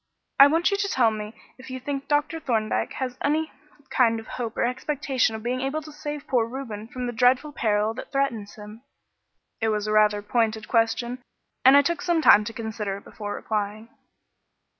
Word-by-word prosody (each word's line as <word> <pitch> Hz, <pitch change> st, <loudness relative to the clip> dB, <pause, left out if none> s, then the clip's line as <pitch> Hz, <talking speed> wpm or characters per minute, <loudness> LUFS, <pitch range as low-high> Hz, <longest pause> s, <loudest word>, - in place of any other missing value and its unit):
I 275 Hz, -, +11 dB
want 330 Hz, +6 st, +2 dB
you 400 Hz, -, +1 dB
to 400 Hz, 0 st, 0 dB
tell 245 Hz, -, +3 dB
me 215 Hz, 0 st, -6 dB, 0.2 s
if 260 Hz, -, -11 dB
you 260 Hz, 0 st, -5 dB
think 275 Hz, +1 st, -4 dB
Dr. 295 Hz, +2 st, 0 dB
Thorndyke 225 Hz, -7 st, -1 dB
has 255 Hz, -1 st, -4 dB
any 310 Hz, +2 st, 0 dB, 0.4 s
kind 230 Hz, -3 st, +3 dB
of 225 Hz, -, -11 dB
hope 230 Hz, -1 st, -5 dB
or -, -, +2 dB
expectation 260 Hz, -2 st, -1 dB
of 220 Hz, -, -7 dB
being 250 Hz, +2 st, -1 dB
able 280 Hz, +4 st, -2 dB
to 310 Hz, -, -10 dB
save 295 Hz, -1 st, -6 dB
poor 240 Hz, -4 st, +1 dB
Reuben 230 Hz, -4 st, -6 dB
from 250 Hz, +1 st, -5 dB
the 240 Hz, -, -3 dB
dreadful 250 Hz, +5 st, +3 dB
peril 215 Hz, -4 st, 0 dB
that -, -, -9 dB
threatens 245 Hz, -7 st, -1 dB
him." 210 Hz, +1 st, -11 dB, 0.8 s
This 225 Hz, -, +1 dB
was 210 Hz, -1 st, -1 dB
a 215 Hz, -, -2 dB
rather 210 Hz, -1 st, +3 dB
pointed 220 Hz, 0 st, 0 dB
question, 235 Hz, +2 st, 0 dB, 0.4 s
and 265 Hz, +2 st, +8 dB
I 285 Hz, -, +6 dB
took 340 Hz, +3 st, -1 dB
some 340 Hz, -3 st, +1 dB
time 210 Hz, -6 st, +7 dB
to 230 Hz, -, -4 dB
consider 220 Hz, -3 st, -4 dB
it 200 Hz, -, -13 dB
before 205 Hz, -1 st, -6 dB
replying. 215 Hz, +1 st, -3 dB
240 Hz, 195 wpm, -25 LUFS, 220-275 Hz, 0.8 s, I